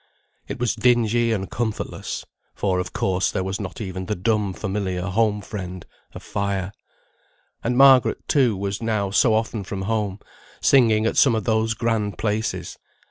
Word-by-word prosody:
It - - -5
was 125 -2 +1
dingy 120 -1 +2
and 95 -3 -1
comfortless; 115 -3 -4 0.3
for, 95 -3 0
of 90 0 -4
course, 95 -1 0
there 95 - -2
was 95 +1 -3
not 95 -3 -6
even 95 -3 -5
the 105 - -1
dumb 105 +1 0
familiar 95 -2 -3
home 105 +2 +1
friend, 90 -3 -7 0.3
a - - -6
fire. 100 -2 -3 0.9
And 120 +1 0
Margaret, 135 -2 +5
too, 125 -8 +3
was 100 +2 -3
now 105 -4 -1
so 110 +2 +4
often 110 -1 -1
from 95 0 -5
home, 105 -2 -1 0.4
singing 110 -5 +4
at - - 0
some 130 -5 +5
of 110 - -1
those 110 0 +1
grand 110 -3 -1
places. 110 0 -2
105 Hz, 160 wpm, -23 LUFS, 95-115 Hz, 0.9 s, Margaret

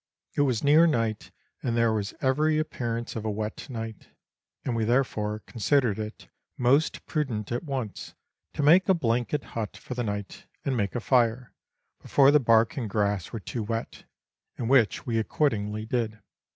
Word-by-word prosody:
It - - +1
was 130 -6 +1
near 155 +4 +6
night, 115 -7 -1 0.3
and 120 -2 -1
there 115 -1 +3
was 105 -1 -3
every 150 +4 +2
appearance 120 -6 -3
of 110 - -4
a 110 - -1
wet 110 +5 -4
night, 115 -3 -7 0.6
and 125 - -1
we 115 - 0
therefore 110 -3 0
con - - -12
sidered 120 -2 +2
it 105 0 -7 0.3
most 135 +5 +2
prudent 120 -9 -2
at 120 - -2
once 130 -8 -5 0.4
to 150 - -2
make 175 +7 +6
a 190 - +6
blanket 125 0 0
hut 110 -2 -4
for - - -7
the 125 0 -2
night, 105 -2 -5 0.2
and 135 - 0
make 100 -2 -1
a - - 0
fire, 125 -1 +1 0.5
before 140 0 +5
the 150 - +6
bark 115 -1 +3
and 120 -5 -2
grass 100 -3 0
were 115 - -4
too 115 +3 -5
wet, 115 +2 -4 0.5
and 120 +1 -2
which 120 -6 +3
we 115 -2 0
accordingly 110 -4 -1
did. 110 -2 -2
115 Hz, 175 wpm, -27 LUFS, 110-135 Hz, 0.6 s, near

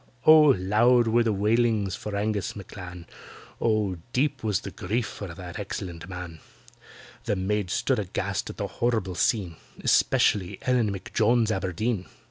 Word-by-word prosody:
Oh! 155 -1 +8
loud 115 +6 +4
were 115 +2 +3
the 115 -1 +1
wailings 105 -1 +1
for 105 -1 -6
ANGUS 105 -2 -1
M'CLAN, 90 -3 -9 0.6
Oh! 110 -5 +1 0.2
deep 135 0 0
was 105 -4 0
the - - -7
grief 110 +6 -2
for 100 - -7
that 90 +3 -8
excellent 90 -3 -6
man; 90 -3 -7 0.9
The - - 0
maids 95 0 -1
stood - - +1
aghast - - -3
at - - -8
the - - -2
horrible 110 -6 -1
scene— 90 -3 0 0.2
Especially 95 -4 +2
ELLEN 125 -5 +2
M'JONES 110 +4 +1
ABERDEEN. 95 +2 -2
105 Hz, 140 wpm, -26 LUFS, 95-115 Hz, 0.9 s, Oh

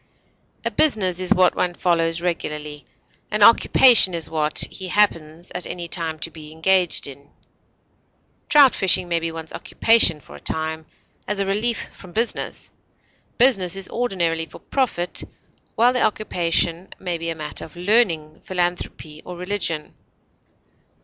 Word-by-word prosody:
A - - 0
business 190 - +3
is 185 -1 -1
what 185 -1 +4
one 175 -1 -1
follows 165 -2 0
regularly; 150 -4 -4 0.4
an 210 -1 +1
occupation 230 -4 +6
is 165 - -3
what 155 -1 0
he 190 - -7
happens 170 -4 0
at 180 - -4
any 175 -1 -6
time 165 -2 -1
to 165 - -4
be 155 -1 -12
engaged 180 +2 +1
in; 140 0 -10 1.2
trout 285 -3 +6
fishing 185 -1 +2
may 170 -1 0
be 165 0 -3
one's 160 -1 -8
occupation 225 -9 +3
for - - -15
a - - -11
time, 160 0 -4 0.4
as 210 0 -2
a 195 - +1
relief 215 +4 -1
from 180 -3 -15
business; 230 +2 -2 0.7
business 195 -8 +3
is 195 -1 -3
ordinarily 170 -9 -1
for - - -13
profit, 235 -10 -2 0.5
while 240 +3 +4
the 250 - 0
occupation 175 -4 0
may 175 -3 -4
be 165 0 -3
a 165 - -3
matter 155 -1 -6
of 160 - -12
learning, 175 -5 0
philanthropy, 175 -4 -4
or 180 - -9
religion. 180 -4 -3
175 Hz, 145 wpm, -21 LUFS, 160-200 Hz, 1.2 s, occupation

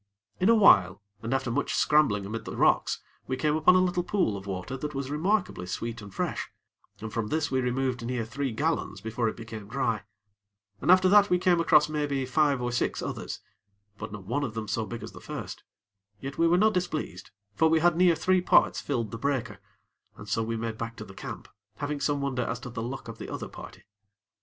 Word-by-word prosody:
In 185 - +3
a 230 - +7
while, 100 - +6 0.2
and 115 - -4
after 130 -2 0
much - - -1
scrambling 140 -10 +3
amid 110 +3 -5
the - - -6
rocks, - - +2 0.2
we 130 - -2
came 150 +3 +1
upon 160 +4 +5
a 185 - +5
little 180 0 +1
pool 175 - 0
of 100 0 -8
water 95 +7 -4
that 150 +2 -5
was 135 0 -3
remarkably 180 - 0
sweet 115 +4 -4
and 100 -1 -10
fresh, - - -3 0.5
and 110 -1 -6
from 115 -2 -1
this 155 +4 -1
we 130 -1 +1
removed 125 0 -1
near 120 -1 -2
three 130 +3 -3
gallons 140 -4 -1
before 110 +2 -1
it - - -8
became 110 -3 -8
dry; 115 -2 -1 0.8
and 145 - -2
after 185 +1 +7
that 205 +1 +6
we 180 - +4
came 180 -1 +3
across, 160 -2 +5
maybe, 145 -3 -1
five 140 +1 +2
or 120 - -1
six 120 - -1
others; - - -5 0.6
but - - -6
not 105 -2 -8
one 120 +8 -1
of 115 -5 -4
them 110 - -2
near 105 - -9
so 110 +2 -1
big 120 - -6
as - - -7
the - - -12
first; - - -7 0.6
yet 135 0 -6
we 165 - +3
were 175 +1 +4
not 215 +3 +4
displeased; 160 - -3 0.2
for 160 +10 +3
we 160 0 +4
had 175 0 +4
near 175 -1 +5
three 185 +3 +2
parts - - +4
filled 115 -7 -2
the 115 - -6
breaker, 130 -6 -2 0.6
and 105 - -10
so 105 +3 0
we 115 0 -2
made 110 -1 -4
back 115 0 -4
to 110 - -8
the 95 - -12
camp, - - -8 0.3
having 145 +5 -3
some 145 0 0
wonder 135 -2 -1
as 120 0 -2
to 125 0 -8
the 115 -1 -4
luck 125 +3 -5
of - - -8
the - - -7
other - - -5
party. - - -11
130 Hz, 225 wpm, -28 LUFS, 115-155 Hz, 0.8 s, a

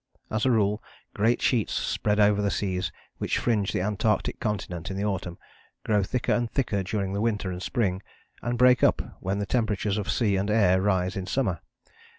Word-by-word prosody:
As 110 +4 +1
a - - +4
rule 105 -2 +2 0.3
great 115 +4 +1
sheets 115 -5 +1
spread 105 0 0
over 105 0 +4
the 100 - +1
seas 95 -3 -1 0.3
which - - 0
fringe 105 -5 +1
the - - -1
Antarctic 105 +1 0
continent 95 -6 -3
in 95 - -4
the 100 - -1
autumn, 95 -4 -3 0.5
grow 105 -2 +3
thicker 120 +6 0
and 120 -1 0
thicker 110 -7 0
during 95 0 -2
the 100 - -1
winter 105 -4 0
and 90 0 -6
spring, 95 -3 -1 0.4
and 120 0 -2
break 125 +1 +5
up - - +2
when 95 +2 -2
the 100 - -1
temperatures 105 -2 0
of 100 - -4
sea 105 -5 +2
and 100 +2 -1
air 95 -4 +4
rise 95 -2 +1
in 95 -1 -4
summer. 135 - 0
105 Hz, 190 wpm, -26 LUFS, 95-110 Hz, 0.5 s, break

